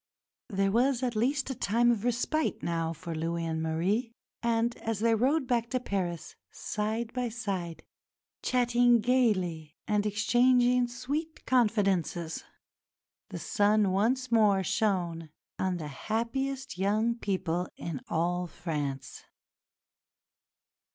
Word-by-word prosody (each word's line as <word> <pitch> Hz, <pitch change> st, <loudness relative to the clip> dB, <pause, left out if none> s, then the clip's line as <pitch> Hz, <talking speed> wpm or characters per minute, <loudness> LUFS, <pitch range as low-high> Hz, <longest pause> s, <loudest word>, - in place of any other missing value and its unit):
There 195 Hz, -2 st, +1 dB
was 250 Hz, +3 st, +2 dB
at 245 Hz, -2 st, -1 dB
least 265 Hz, +5 st, 0 dB
a -, -, -1 dB
time 240 Hz, +1 st, +2 dB
of 220 Hz, -3 st, -1 dB
respite 245 Hz, +6 st, 0 dB
now 165 Hz, -1 st, -1 dB
for 165 Hz, +1 st, -6 dB
Louis 165 Hz, +1 st, -2 dB
and 160 Hz, -1 st, -2 dB
Marie, 185 Hz, +9 st, 0 dB, 0.3 s
and 235 Hz, 0 st, +1 dB
as 225 Hz, -1 st, -3 dB
they 230 Hz, +1 st, +3 dB
rode 265 Hz, +6 st, +2 dB
back 235 Hz, -2 st, 0 dB
to 255 Hz, -, 0 dB
Paris, 175 Hz, -8 st, -3 dB
side 220 Hz, +2 st, -3 dB
by 250 Hz, -2 st, -1 dB
side, 195 Hz, -7 st, -4 dB, 0.6 s
chatting 245 Hz, -1 st, +3 dB
gaily 185 Hz, -11 st, +1 dB
and 210 Hz, -1 st, +1 dB
exchanging 245 Hz, +4 st, +3 dB
sweet 290 Hz, +7 st, -4 dB
confidences, 195 Hz, -9 st, +1 dB, 0.9 s
the -, -, -6 dB
sun 205 Hz, -1 st, +2 dB
once 240 Hz, +6 st, +1 dB
more 210 Hz, -4 st, +4 dB
shone 175 Hz, -5 st, 0 dB, 0.3 s
on 185 Hz, -1 st, 0 dB
the 155 Hz, -3 st, -5 dB, 0.2 s
happiest 260 Hz, +1 st, -2 dB
young 215 Hz, +4 st, +2 dB
people 185 Hz, -6 st, -2 dB
in 160 Hz, -6 st, -5 dB
all 175 Hz, +2 st, 0 dB
France. 145 Hz, -6 st, -5 dB
215 Hz, 120 wpm, -29 LUFS, 175-245 Hz, 0.9 s, more